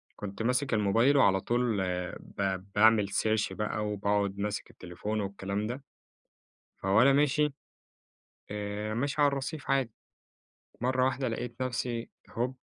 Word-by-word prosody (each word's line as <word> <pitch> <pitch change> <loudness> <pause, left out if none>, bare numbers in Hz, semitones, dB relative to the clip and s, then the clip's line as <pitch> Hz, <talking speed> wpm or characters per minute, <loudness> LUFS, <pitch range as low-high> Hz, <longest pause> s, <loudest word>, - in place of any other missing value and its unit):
كنت 100 +1 -6
ماسك 125 +2 +1
الموبايل 115 +7 +4
وعلى 95 -6 +4
طول 120 -4 +1
آآ 90 -1 -2
ب 95 0 -3
باعمل 105 -1 +5
search 110 -1 +1
بقى 105 0 -2
وباقعد 100 -1 0
ماسك 105 0 -3
التليفون 100 +5 -4
والكلام 100 +1 -3
ده. 130 +4 -5 1.0
فوأنا 110 +8 +5
ماشي 145 +1 +3 1.0
آآ، 105 +1 -3
ماشي 140 +4 -1
على 145 - +6
الرصيف 140 +1 -3
عادي، 135 -5 +2 0.9
مرّة 130 +1 +2
واحدة 130 -1 0
لقيت 120 +2 -4
نفسي 120 -2 -2 0.2
هُوب 125 +3 -2
110 Hz, 130 wpm, -30 LUFS, 100-130 Hz, 1.0 s, على